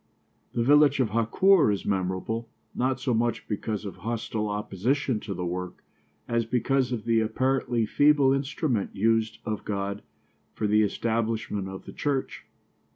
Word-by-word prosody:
The 115 - +1
village 145 +1 +5
of 125 -4 +2
Hakoor 115 - +4
is 100 - -3
memorable, 95 +4 -2 0.2
not 130 +1 0
so 130 -1 0
much 120 +1 0
because 105 0 -3
of 100 - -7
hostile 110 +1 -3
opposition 110 +5 -1
to 100 -2 -6
the 90 0 -3
work 90 +1 -5 0.4
as 115 0 +1
because 125 +2 0
of 115 -4 -3
the 115 -1 +3
apparently 120 +1 0
feeble 145 +2 +4
instrument 135 - -1
used 110 +1 +1
of 110 -1 -3
God 100 0 -3 0.5
for 110 - -2
the 105 +1 +4
establishment 110 -2 -1
of 95 0 -8
the - - -9
church. 140 -2 -3
115 Hz, 150 wpm, -27 LUFS, 105-130 Hz, 0.5 s, village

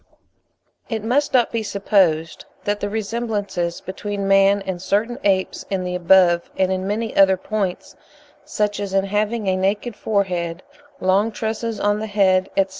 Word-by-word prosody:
It 220 -3 -3
must 265 +6 +1
not 245 -2 +3
be 230 - -1
supposed 190 -6 +1 0.2
that 205 0 -1
the 205 - -2
resemblances 205 -5 -3
between 200 +1 -4
man 195 0 +4
and 185 -2 -4
certain 225 +6 -1
apes 190 -2 0
in 190 -2 -1
the 180 0 -3
above 180 -1 +4
and 190 0 +2
in 190 0 -2
many 220 +2 -2
other 190 -1 +5
points—such 205 +1 -4
as 200 -1 -3
in 195 0 +2
having 210 +2 -1
a 190 - +2
naked 200 +4 -1
forehead, 180 -5 -2 0.4
long 195 +4 +2
tresses 220 0 -3
on 205 0 +1
the 220 - -4
head, 190 -2 +2
etc. 195 -1 +3
200 Hz, 155 wpm, -21 LUFS, 185-215 Hz, 0.4 s, other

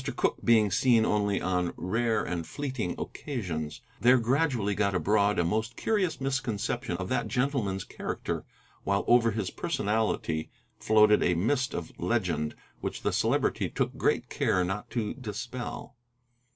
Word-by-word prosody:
Cooke - - 0
being 110 -3 +4
seen 115 0 +4
only 105 -1 +1
on 90 -1 0
rare 115 +3 0
and 85 -2 -3
fleeting 130 -10 -3
occasions, 85 - -4 0.2
there 125 +2 +6
gradually 125 -4 +1
got 100 -1 +1
abroad 100 +4 +2
a 85 - +3
most 110 +6 -1
curious 205 -6 0
misconception 125 -6 -2
of 90 0 -4
that - - 0
gentleman's 120 -5 0
character, - - -4 0.4
while 100 0 +1
over 120 -1 +5
his 105 -4 -2
personality 105 - -1 0.3
floated 105 -1 +5
a 90 - +2
mist 130 +9 0
of 85 - -5
legend 85 -7 0 0.2
which - - -5
the - - +1
Celebrity - - +1
took - - -1
good - - +1
care 90 - +1
not 95 +3 -3
to 110 -3 -2
dispel. 120 +1 -6
110 Hz, 140 wpm, -29 LUFS, 95-125 Hz, 0.4 s, there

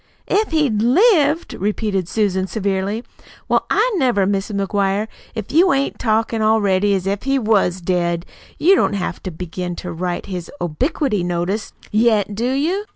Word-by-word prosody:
"'If 425 +2 +1
he'd 290 -10 +1
lived'!" 315 - +3
repeated 200 -2 -2
Susan 190 -3 0
severely. 200 +2 -2 0.4
"Well, - - +1
I 470 +4 +2
never, 245 - +2
Mis' 195 +1 -1
McGuire, 200 0 0 0.3
if 220 -3 -5
you 345 +4 +5
ain't 275 0 -1
talkin' 225 0 0
already 205 -2 +3
as 190 -1 -2
if 200 +1 -1
he 275 +1 +1
was 205 -6 +1
dead! 175 -1 0 0.3
You 365 +5 +5
don't 380 - +2
have 195 -3 -3
to - - -5
begin 180 +1 -5
to 175 +1 -6
write 175 +1 -3
his 180 -3 -6
obliquity 210 - -1
notice 175 +4 -2 0.2
yet, 215 -2 +2
do 235 +5 -1
you?" 335 +10 0
205 Hz, 155 wpm, -19 LUFS, 190-250 Hz, 0.4 s, you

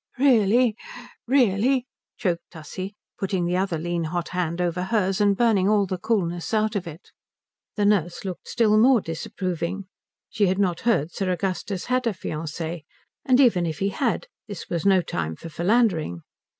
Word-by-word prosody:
"Really? 240 -3 +4 0.5
Really?" 250 0 +3 0.3
choked 175 -7 -2
Tussie, 185 +5 -7 0.2
putting 190 -2 -1
the 175 +1 0
other 185 -2 0
lean 170 +1 -2
hot 170 +1 -3
hand 175 -2 -2
over 180 +1 -1
hers 195 -1 +1
and 200 -1 +3
burning 210 -5 +3
all 210 -2 +3
the 185 -1 -4
coolness 185 -3 -1
out 215 0 +1
of 185 -4 -2
it. 165 +2 -11 0.6
The 205 - +1
nurse 185 -3 +1
looked 185 -2 -6
still 215 -3 +3
more 250 +2 +6
disapproving. 180 +2 -4 0.4
She 210 -3 +1
had 185 +1 +1
not 185 -4 +1
heard 165 -8 +1
Sir 195 -2 -2
Augustus 185 +1 -2
had 250 -1 0
a 225 - +1
fiancée, 160 0 -5 0.4
and 260 -2 +4
even 205 -10 +4
if 155 -2 -3
he 195 - 0
had 235 +3 -1 0.2
this 205 -5 -7
was 170 +2 0
no 190 -2 +5
time 80 - -3
for 165 - -9
philandering. 170 - +1
190 Hz, 165 wpm, -24 LUFS, 170-215 Hz, 0.6 s, more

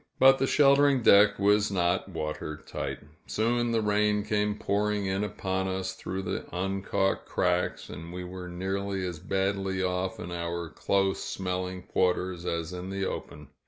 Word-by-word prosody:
But 135 0 +7
the 135 - +2
sheltering 140 -2 +5
deck 100 0 +7
was 105 +1 +3
not 90 -3 0
water 75 0 -4
tight; - - -4 0.3
soon 120 +2 +1
the 115 -1 +1
rain 105 0 +2
came 105 0 0
pouring 105 0 0
in 95 +1 0
upon 95 -2 -2
us 95 0 -2
through 95 +1 -5
the 90 - -3
uncaulked 95 +1 -1
cracks, 90 0 0
and 85 +1 -8
we 90 +1 -5
were 90 0 -7
nearly 95 +2 -2
as 90 -3 -4
badly 95 +1 -1
off 95 +3 -1
in 90 -4 -6
our 85 -1 -3
close 95 -1 +1
smelling 90 -1 -3
quarters 90 -1 0
as 85 +1 -2
in 90 +1 -6
the 95 0 -2
open. 75 -5 -6
95 Hz, 160 wpm, -28 LUFS, 90-105 Hz, 0.3 s, But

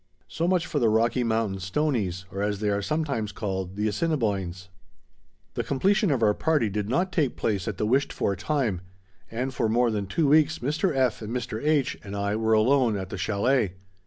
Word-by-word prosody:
So 165 +2 -2
much 180 -1 +2
for 150 - -1
the 115 -4 +3
Rocky 115 +3 +2
Mountain 110 -4 0
Stoneys, 100 - -1
or 100 - -4
as 105 -1 -1
they 105 -1 0
are 100 0 0
sometimes 140 -6 -2
called, 95 -3 -4
the 105 +1 0
Assiniboines. 100 - -1 0.8
The - - -2
completion 195 - +2
of 130 -6 +1
our 105 -1 +4
party 150 -5 +1
did 105 +1 -2
not 180 +9 +1
take 150 -9 0
place 100 -4 -1
at 105 - -3
the 105 - 0
wished 135 +5 +2
for 100 - -1
time, 115 - -1 0.5
and 125 +4 -3
for 115 -3 0
more 120 +1 +2
than 105 -2 -2
two 150 - +1
weeks 155 +2 +4
Mr. 150 +9 0
F. 130 -4 +1
and 110 0 -6
Mr. 115 -2 -4
H., 150 -3 +1
and 100 0 -7
I 100 +1 -1
were 110 0 +1
alone 115 0 +3
at 95 -2 -5
the 95 - -5
chalet. 105 +1 +1
115 Hz, 200 wpm, -26 LUFS, 100-140 Hz, 0.8 s, our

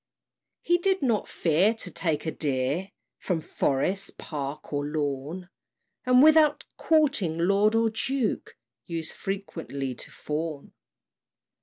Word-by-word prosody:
He 350 0 +3
did 380 -2 +1
not 230 -5 +1
fear 180 +7 +2
to 225 - -4
take 160 -4 -1
a 160 - -1
deer 145 +6 -1 0.3
From 180 -4 -1
forest, 160 +6 -1
park, 150 0 -6
or 145 0 0
lawn; 150 +3 -3 0.6
And 250 +1 +6
without 305 -1 +5
courting 280 - +2
lord 200 +5 +3
or 225 0 +3
duke, 250 +1 -2 0.3
Used 165 -2 -3
frequently 165 -9 -4
to - - -8
fawn. 150 -1 -5
180 Hz, 120 wpm, -27 LUFS, 150-225 Hz, 0.6 s, And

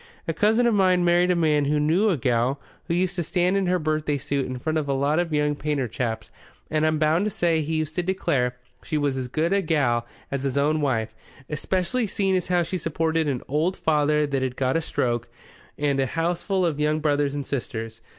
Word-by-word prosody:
"A 165 - 0
cousin 220 +7 +3
of 235 - +3
mine 185 -3 +3
married 175 +1 +4
a 180 - +3
man 155 -4 +2
who 150 +1 +1
knew 170 +9 +3
a 180 - +1
gal 125 +1 +1 0.3
who 170 - 0
used 185 +1 0
to 175 - 0
stand 180 +3 +1
in 195 -2 +1
her 180 +1 +2
birthday 155 -2 -1
suit 140 0 -2
in 130 0 -4
front 155 +5 -1
of 145 -2 -4
a - - +2
lot 140 +4 +1
of 175 -2 -1
young 150 -1 +1
painter 145 -3 -2
chaps 110 -1 -4 0.4
and 155 0 +2
I'm 155 0 +1
bound 155 +4 +2
to - - +1
say 170 -4 +1
he 155 +2 -2
used 155 -1 -2
to - - +3
declare 145 -9 0 0.3
she 155 - -2
was 145 -2 0
as 130 -1 -3
good 160 +8 0
a 200 - +3
gal 135 -9 +1 0.2
as 140 -1 -2
his 135 0 -2
own 150 +2 +2
wife, 115 -6 0 0.4
especially 190 - -1
seeing 195 -1 0
as 180 - -1
how 180 -1 +2
she 180 +3 -3
supported 160 0 0
an 130 -4 -2
old 160 +7 0
father 150 -1 +2
what 140 -2 0
had 130 -1 -2
got 130 0 0
a 165 - +2
stroke, 120 -6 -1 0.5
and 145 -2 0
a 135 - +2
houseful 175 +4 0
of 155 -4 -1
young 150 +1 +1
brothers 145 -2 +1
and 145 -1 -3
sisters. 115 -4 -5
155 Hz, 230 wpm, -24 LUFS, 140-175 Hz, 0.5 s, married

